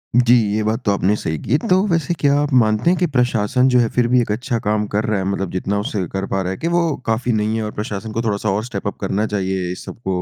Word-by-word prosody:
जी, 125 0 +5 0.2
ये 110 - 0
बात 110 +3 -1
तो 100 - +3
आपने 100 +1 +2
सही 80 -6 -3
की 140 - +2
तो 180 - +5
वैसे 165 -2 0
क्या 140 0 +3
आप 145 -1 -1
मानते 110 +7 +2
हैं 180 - +3
कि 180 - +2
प्रशासन 125 0 +2
जो 125 -1 +4
है 115 - +3
फ़िर 120 -1 +1
भी 125 0 +3
एक 110 - -2
अच्छा 115 +1 -2
काम 105 0 +1
कर 105 +2 -1
रहा 105 -2 0
है। 95 - -2
मतलब 95 -2 -2
जितना 100 +2 -1
उससे 100 -2 -2
कर 95 0 -2
पा 95 - +1
रहा 90 0 -2
है 95 - -4
कि 165 - -3
वो 175 - +4 0.2
काफ़ी 115 +2 0
नहीं 110 +1 0
है 110 - -2
और 105 - -4
प्रशासन 105 0 -4
को 115 - -2
थोड़ा-सा 105 -2 -1
और 100 +3 0
स्टेप-अप 100 -4 -4
करना 100 +2 0
चाहिए 95 -3 -2
इस 90 - -8
सबको 95 -5 -4
110 Hz, 275 wpm, -19 LUFS, 100-125 Hz, 0.2 s, जी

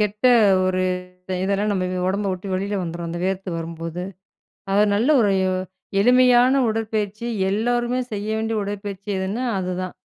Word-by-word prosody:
கெட்ட 210 +3 -2 0.4
ஒரு 185 0 0 0.6
இதெல்லாம் 200 +2 0
நம்ம 185 -2 0 0.2
ஒடம்ப 200 +1 0
விட்டு 185 +2 -6
வெளியில 200 +2 -2
வந்துரும் 170 0 -5
அந்த 170 - -4
வேர்த்து 190 0 -2
வரும்போது. 165 +1 -5 0.7
அது 205 +1 +5
நல்ல 230 +7 +1
ஒரு 205 -3 +3 0.7
எளிமையான 250 +3 +5
உடற்பயிற்சி. 215 0 -2 0.2
எல்லோருமே 240 +4 0
செய்ய 205 +1 -3
வேண்டிய 220 0 -1
உடற்பயிற்சி 200 0 -5
எதுன்னா, 200 +7 -2
அதுதான். 185 0 -3
200 Hz, 130 wpm, -22 LUFS, 185-220 Hz, 0.7 s, அது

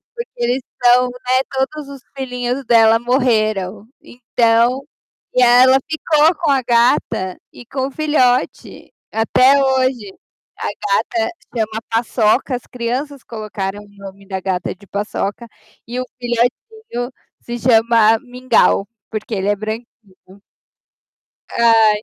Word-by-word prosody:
porque 470 - -6
eles 245 +2 0 0.2
são, 245 +1 +5
né, 250 +1 0
todos 275 +2 -3
os 275 -2 -10 0.2
filhinhos 250 0 -3
dela 225 -1 +5
morreram", 215 -5 0
então, 240 +1 +1 0.5
e 255 - +3
aí 245 +1 +7
ela 260 +1 +6
ficou 315 +1 +2
com 300 - +3
a 270 - +2
gata 235 -6 +1 0.2
e 245 - -13
com 265 +1 -3
o - - -9
filhote, 265 -4 0 0.2
até 255 +5 +4
hoje, 255 -6 0 0.4
a - - -4
gata 360 -6 -1 0.3
chama 220 0 -2
Paçoca. 230 +2 +1
As 245 - -8
crianças 255 +3 -4
colocaram 205 -3 -5
o 205 - -16
nome 200 -1 -12
da 190 -1 -3
gata 185 -1 -2
de 200 - -19
Paçoca, 205 +3 -4 0.4
e 245 +2 -4
o - - -5
filhotinho 245 - -2 0.3
se 240 0 -6
chama 225 -2 +4
Mingau, 250 -5 +1 0.3
porque 215 0 -4
ele 195 0 -2
é 205 - +2
branquinho. 215 +3 -5 1.6
Ai, 225 -2 +4
240 Hz, 130 wpm, -18 LUFS, 220-260 Hz, 1.6 s, aí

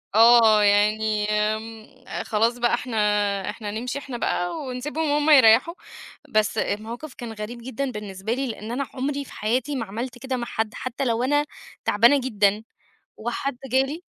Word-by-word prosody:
آه 225 -2 +7
يعني، 210 +1 +2
آمم، 215 +1 -2 0.4
خلاص 230 +3 +1
بقى 240 0 +1
إحنا 240 -2 -2 0.5
إحنا 210 -3 -5
نمشي 245 +6 -4
إحنا 265 -4 -7
بقى 180 - -1
ونسيبهم 290 +4 -3
هُم 295 +1 +2
يرَيّحوا. 265 +3 +6 0.6
بس 215 -1 +1
الموقف 235 +7 -3
كان 235 -2 -7
غريب 220 +3 -7
جدًا 260 +1 -3
بالنسبة 210 0 -4
لي، 270 +1 -2
لإن 220 -1 -6
أنا 265 +2 -2
عمري 280 +1 -3
في - - -14
حياتي 250 +6 -1
ما 230 -4 -2
عملت 240 +5 -6
كده 260 +1 -3
مع 240 - -3
حد، 220 -1 -2
حتّى 255 +2 -4
لو 235 0 0
أنا 290 +2 +2 0.4
تعبانة 235 +7 +5
جدًا 210 -3 +1 0.5
وحد 240 +3 -3
جالي 270 +6 +1
235 Hz, 155 wpm, -24 LUFS, 215-265 Hz, 0.6 s, آه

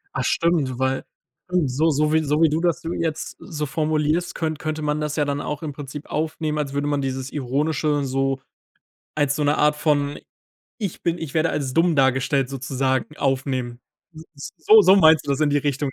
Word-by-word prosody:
Ah, - - -1
stimmt, 155 -7 +1
weil 130 +1 -1 0.4
un 180 -6 +1
so 155 +6 +2
so 150 +1 +1
wie 160 0 +3
so 150 +1 0
wie 160 - +6
du 155 - 0
das 170 0 0 0.2
jetzt 160 -2 -3
so 150 -2 -5
formulierst, 155 +4 0
könn 160 -2 -2
könnte 155 +1 -4
man 150 0 -1
das 150 -1 -2
ja 150 - +1
dann 145 0 -2
auch 150 +1 -5
im 150 - -3
Prinzip 145 +1 -8
aufnehmen, 155 0 -2
als 145 -2 -3
würde 140 +1 -1
man 145 -1 0
dieses 130 0 -4
Ironische 145 +2 0
so 135 0 -1 0.8
als 145 -2 +1
so 150 - -1
'ne 145 +1 +2
Art 150 0 +4
von 145 -2 0 0.6
„Ich 200 -7 -5
bin 170 0 0
ich 160 -5 -6
werde 160 +1 +2
als 135 -3 -2
dumm 165 +2 +2
dargestellt" 130 0 +2
sozusagen 130 +2 -2
aufnehmen. 130 -3 -2 0.3
S 160 +2 -10
S - - -25
So 190 0 +6
meinst 160 -5 +5
du 140 - -2
das 140 - 0
in 155 - +3
die 145 - +3
Richtung, 145 -1 -1
150 Hz, 200 wpm, -22 LUFS, 135-155 Hz, 0.8 s, wie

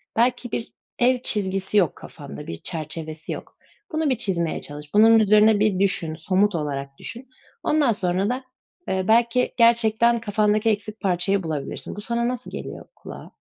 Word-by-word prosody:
Belki 245 +1 0
bir 230 - -5 0.3
ev 250 +1 +3
çizgisi 195 -1 +1
yok 180 -6 +2
kafanda, 70 - -11
bir 85 - -5
çerçevesi 155 - -5
yok. - - -8 0.4
Bunu 315 -1 0
bir 255 - +1
çizmeye 170 -7 0
çalış. 145 0 -7
Bunun 225 +2 +6
üzerine 215 0 +4
bir 210 -3 +1
düşün, 170 -5 +2
somut 185 +4 +1
olarak 140 -3 -4
düşün. 245 +2 -7 0.3
Ondan 300 -5 +2
sonra 190 -1 -1
da, 255 +2 -3 0.4
eee, 190 0 -1
belki 235 +2 +2
gerçekten 235 0 +4
kafandaki 215 0 +1
eksik 215 0 -2
parçayı 190 0 +1
bulabilirsin. 150 -4 -3
Bu 205 - -7
sana 235 +2 -1
nasıl 250 0 -4
geliyor - - -8
kulağa? - - -11
210 Hz, 155 wpm, -23 LUFS, 175-235 Hz, 0.4 s, Bunun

